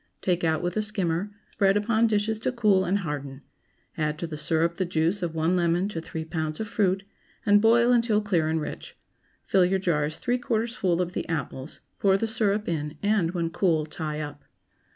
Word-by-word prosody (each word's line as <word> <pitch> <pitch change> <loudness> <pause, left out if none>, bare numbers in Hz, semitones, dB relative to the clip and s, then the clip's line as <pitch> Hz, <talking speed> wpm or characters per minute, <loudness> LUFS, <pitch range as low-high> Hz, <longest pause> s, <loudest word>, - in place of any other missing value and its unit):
Take 180 -2 +1
out 160 0 +1
with 175 0 -2
a - - +3
skimmer; 195 -3 -1 0.2
spread 195 0 +3
upon 220 +2 +2
dishes 215 0 0
to 225 - -1
cool 210 -6 +3
and 190 +3 +1
harden; 140 -2 -5 0.5
add 150 -1 -1
to 170 - -4
the 160 -2 -6
syrup 165 +2 +1
the 190 - +1
juice 170 +3 0
of 170 -2 -3
one 165 +3 +1
lemon 175 +1 +1
to 165 -6 -4
three 160 0 -6
pounds 155 -1 -3
of 220 - -3
fruit, 195 -2 +1 0.4
and 205 -1 +5
boil 235 +2 +5
until 230 -3 +3
clear 180 -7 +1
and 160 0 +1
rich. 150 - -7 0.5
Fill 190 -2 +4
your 190 +2 +2
jars 155 -4 0
three 245 +1 -1
quarters 230 0 -1
full 180 -5 +1
of 175 - -6
the - - -4
apples, 150 -3 -4 0.2
pour 195 -1 +4
the 225 - -1
syrup 215 -1 +1
in, 150 -2 -3
and, 200 -4 +1
when 165 -1 -1
cool, 165 -3 +1
tie 155 -1 -5
up. 145 -1 -7
180 Hz, 200 wpm, -26 LUFS, 160-210 Hz, 0.5 s, and